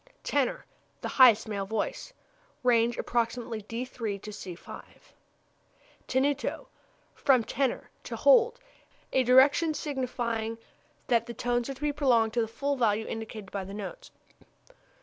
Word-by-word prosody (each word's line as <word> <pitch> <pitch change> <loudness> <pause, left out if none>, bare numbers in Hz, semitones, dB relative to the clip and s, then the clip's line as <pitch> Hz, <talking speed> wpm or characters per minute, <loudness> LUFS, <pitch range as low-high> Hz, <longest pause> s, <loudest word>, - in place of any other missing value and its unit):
Tenor 280 -3 0 0.4
the - - -3
highest 235 -5 +6
male 200 -2 -3
voice. 220 - -3 0.5
Range 235 -1 +3
approximately 230 -1 -2
d 230 +4 -5
c''. 210 -6 -6 1.5
Tenuto 280 +2 0 0.5
(from 255 -4 +3
teneo, 265 +2 -1 0.2
to - - -5
hold) 480 -1 +5 0.6
a 260 - +4
direction 275 +6 +5
signifying 240 -6 -3 0.5
that 235 -1 +2
the 235 - -7
tones 240 +2 -1
are 275 - -4
to 265 - -18
be 295 -1 0
prolonged 240 -6 +2
to 240 - +2
the 225 - -1
full 280 +6 -2
value 220 -3 +1
indicated 220 -3 -7
by 200 -1 -3
the 195 +2 -8
notes. - - -7
240 Hz, 130 wpm, -28 LUFS, 220-270 Hz, 1.5 s, highest